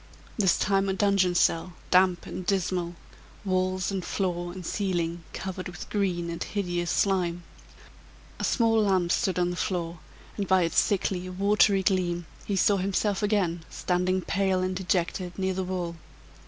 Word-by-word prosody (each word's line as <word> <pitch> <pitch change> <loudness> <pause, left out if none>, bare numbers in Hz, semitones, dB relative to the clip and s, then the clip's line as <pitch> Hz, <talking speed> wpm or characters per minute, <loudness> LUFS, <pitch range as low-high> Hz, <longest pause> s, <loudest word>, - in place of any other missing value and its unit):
This 190 -5 +3
time 195 -1 +1
a - - +1
dungeon 195 -2 +2
cell, 175 +1 +2 0.2
damp 180 -1 +4
and 185 - -6
dismal; 180 -2 -1 0.5
walls, 185 0 0
and 190 -2 -2
floor, 175 -2 -2
and 180 -1 -8
ceiling 175 -4 -1
covered 185 -1 -5
with 175 - -9
green 180 -4 0
and 170 - -3
hideous 175 -4 -2
slime. 175 -3 +1 1.0
A - - -4
small 225 -2 +3
lamp 190 -4 +2
stood 190 0 +1
on 180 0 +1
the - - -4
floor, 175 -3 -2 0.4
and 200 -2 -2
by 190 -1 +4
its 165 - +3
sickly, 185 -2 0
watery 200 +1 +3
gleam, 175 -3 0 0.2
he 200 - -1
saw 200 +1 +3
himself 195 +2 0
again 190 -6 +1
standing, 185 +1 0
pale 190 0 +1
and 185 0 -1
dejected, 180 -1 -1
near 190 -1 0
the 190 0 -2
wall. 180 -2 -3
185 Hz, 155 wpm, -27 LUFS, 175-195 Hz, 1.0 s, damp